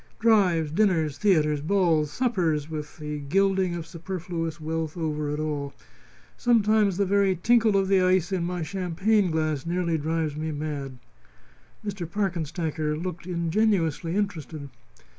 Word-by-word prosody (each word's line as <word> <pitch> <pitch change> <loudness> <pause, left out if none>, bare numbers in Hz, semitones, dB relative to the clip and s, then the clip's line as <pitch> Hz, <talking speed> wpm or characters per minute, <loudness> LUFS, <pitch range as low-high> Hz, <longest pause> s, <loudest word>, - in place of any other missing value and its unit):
Drives, 190 -9 +3
dinners, 160 -6 +1
theatres, 150 -7 +3
balls, 165 -3 +2
suppers, 165 - 0
with 150 0 -6
the 150 -1 -5
gilding 190 +4 +1
of 170 -2 -5
superfluous 170 -1 -5
wealth 160 +1 -3
over 150 -2 -2
it 150 +1 -2
all. 145 -2 -3 0.6
Sometimes 215 -5 +3
the 200 - +2
very 195 0 +2
tinkle 220 +2 +3
of 195 -1 +1
the 195 -1 +4
ice 185 0 +2
in 185 -3 0
my 175 -1 -2
champagne 190 +3 +1
glass 155 -3 -1
nearly 170 -1 -1
drives 160 0 -1
me 155 +1 -3
mad." 145 -3 -4 0.9
Mr. 190 -5 -4
Parkenstacker 165 -5 -2
looked 175 +1 -5
ingenuously 170 -1 0
interested. 160 -8 -3
170 Hz, 135 wpm, -26 LUFS, 155-195 Hz, 0.9 s, the